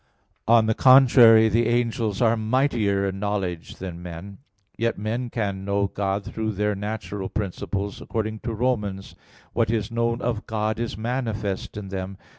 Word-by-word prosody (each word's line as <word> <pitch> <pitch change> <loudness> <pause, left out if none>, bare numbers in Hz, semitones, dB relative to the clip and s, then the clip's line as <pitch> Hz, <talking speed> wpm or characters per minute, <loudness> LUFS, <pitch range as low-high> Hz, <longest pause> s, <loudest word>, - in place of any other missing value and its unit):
On 115 -1 +5
the 110 - +2
contrary, 120 -3 +7
The 115 +1 +2
angels 115 -2 0
are 115 0 +4
mightier 110 -4 +1
in 95 0 -4
knowledge 95 -5 -3
than 90 -2 -7
men. 90 +3 -9 0.4
Yet 115 0 -1
men 115 +4 -3
can 100 -5 -3
know 100 0 0
God 100 0 -2
through 110 -1 -3
their 105 +1 0
natural 105 -1 -5
principles; 100 0 -4
according 110 -1 -3
to 115 - -4
Rom. 125 0 +1
1:19: 95 -1 -7 0.4
"what - - +1
is 110 -1 -1
known 115 0 0
of 115 -3 -3
God 110 0 -1
is 115 -3 -3
manifest 110 -5 -3
in 100 -2 -6
them." 95 0 -5
110 Hz, 160 wpm, -24 LUFS, 100-115 Hz, 0.4 s, contrary